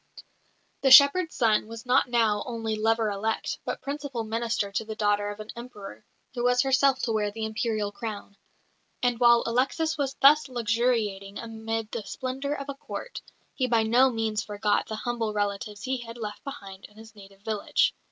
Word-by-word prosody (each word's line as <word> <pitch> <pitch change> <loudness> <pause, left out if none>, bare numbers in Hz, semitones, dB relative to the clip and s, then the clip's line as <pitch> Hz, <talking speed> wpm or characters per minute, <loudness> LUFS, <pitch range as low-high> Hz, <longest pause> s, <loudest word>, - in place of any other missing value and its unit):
The 270 - +3
shepherd's 285 +6 +7
son 220 -4 +2
was 230 +1 -9
now 250 +1 +4
not 225 -4 +2
only 225 -2 -3
lover 225 0 +1
elect, 220 +3 -2
but - - -4
principal 280 -4 -4
"minister" 225 -2 -2
to 200 - -1
the 220 0 -7
daughter 205 -1 +1
of 205 +1 -7
an 215 0 -7
Emperor, 210 - -10 0.3
who 240 -1 -3
was 245 0 +3
herself 270 0 +3
to 230 - 0
wear 210 -2 0
the 220 +2 -4
Imperial 220 -1 -2
crown. 205 -2 -7 0.7
And 245 -2 +1
while 235 -1 +6
Alexis 285 +7 0
was 275 -1 -1
thus 295 +1 +5
luxuriating 225 -4 -1
amid 225 -1 -4
the 235 - -3
splendour 265 +6 -4
of 280 -1 -7
a 280 - -4
Court, - - -7 0.3
he 255 -2 -1
by 230 -2 +3
no 245 +4 +4
means 225 -2 -1
forgot 210 0 0
the 220 - -4
humble 230 -1 -2
relatives 205 0 -3
he 260 0 -1
had 230 0 -9
left 210 -3 -6
behind 195 -8 -9
in 210 - -17
his 220 0 -13
native 195 -1 -15
village. 210 -1 +1
225 Hz, 180 wpm, -27 LUFS, 210-250 Hz, 0.7 s, shepherd's